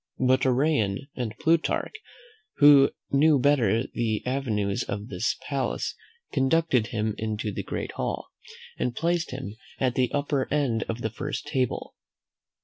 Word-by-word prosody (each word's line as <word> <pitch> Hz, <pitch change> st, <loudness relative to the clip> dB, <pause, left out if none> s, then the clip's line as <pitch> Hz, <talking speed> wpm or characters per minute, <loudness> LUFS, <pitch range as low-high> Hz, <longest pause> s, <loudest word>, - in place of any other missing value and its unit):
But 130 Hz, +1 st, +3 dB
Arrian 130 Hz, -4 st, +1 dB
and 115 Hz, -4 st, -4 dB
Plutarch, 165 Hz, 0 st, +1 dB, 0.6 s
who 145 Hz, -1 st, +7 dB, 0.2 s
knew 150 Hz, +2 st, +5 dB
better 125 Hz, -5 st, +3 dB
the 110 Hz, -3 st, -1 dB
avenues 110 Hz, -7 st, -1 dB
of 100 Hz, +2 st, -4 dB
this 100 Hz, +3 st, -1 dB
palace, 135 Hz, -3 st, -2 dB, 0.4 s
conducted 135 Hz, -4 st, +2 dB
him 110 Hz, -2 st, -1 dB
into 110 Hz, -1 st, -2 dB
the -, -, -4 dB
great -, -, -4 dB
hall, -, -, -4 dB, 0.5 s
and 125 Hz, -1 st, -1 dB
placed 170 Hz, 0 st, 0 dB
him 130 Hz, -5 st, -6 dB, 0.2 s
at 130 Hz, -2 st, +1 dB
the 125 Hz, -1 st, +1 dB
upper 145 Hz, -2 st, -1 dB
end 135 Hz, -6 st, +1 dB
of 115 Hz, +1 st, -3 dB
the 110 Hz, -, -1 dB
first 145 Hz, +7 st, -4 dB
table. 135 Hz, -4 st, -2 dB
130 Hz, 140 wpm, -26 LUFS, 110-145 Hz, 0.6 s, who